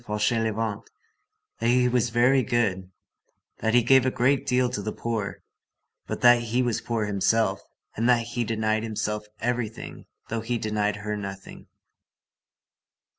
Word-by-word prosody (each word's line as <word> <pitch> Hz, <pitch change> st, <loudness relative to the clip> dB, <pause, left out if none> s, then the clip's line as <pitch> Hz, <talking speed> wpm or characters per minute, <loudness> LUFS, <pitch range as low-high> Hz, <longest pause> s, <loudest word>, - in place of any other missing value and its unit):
Fauchelevent, 110 Hz, -1 st, -1 dB, 0.7 s
that 115 Hz, -, 0 dB
he 125 Hz, +1 st, +4 dB
was 125 Hz, -1 st, +1 dB
very 125 Hz, +3 st, +4 dB
good, 100 Hz, -6 st, 0 dB, 0.7 s
that 110 Hz, +1 st, +1 dB
he 120 Hz, -, +5 dB
gave 130 Hz, +2 st, +5 dB
a 130 Hz, -, +2 dB
great 130 Hz, +2 st, +1 dB
deal 125 Hz, 0 st, +2 dB
to 105 Hz, -, -4 dB
the 110 Hz, +2 st, -3 dB
poor, 110 Hz, -4 st, -4 dB, 0.6 s
but -, -, -4 dB
that 120 Hz, -1 st, +6 dB
he 120 Hz, +2 st, 0 dB
was 120 Hz, -3 st, -1 dB
poor 115 Hz, -2 st, -2 dB
himself, 105 Hz, +2 st, +1 dB, 0.3 s
and 115 Hz, +3 st, +1 dB
that 120 Hz, -1 st, +4 dB
he 120 Hz, -, 0 dB
denied 110 Hz, -1 st, 0 dB
himself 105 Hz, -1 st, -3 dB
everything 120 Hz, -2 st, -4 dB, 0.2 s
though 115 Hz, 0 st, -3 dB
he 120 Hz, +2 st, -2 dB
denied 105 Hz, -1 st, -1 dB
her 105 Hz, +1 st, -4 dB
nothing. 100 Hz, -1 st, -8 dB
115 Hz, 145 wpm, -25 LUFS, 105-120 Hz, 0.7 s, that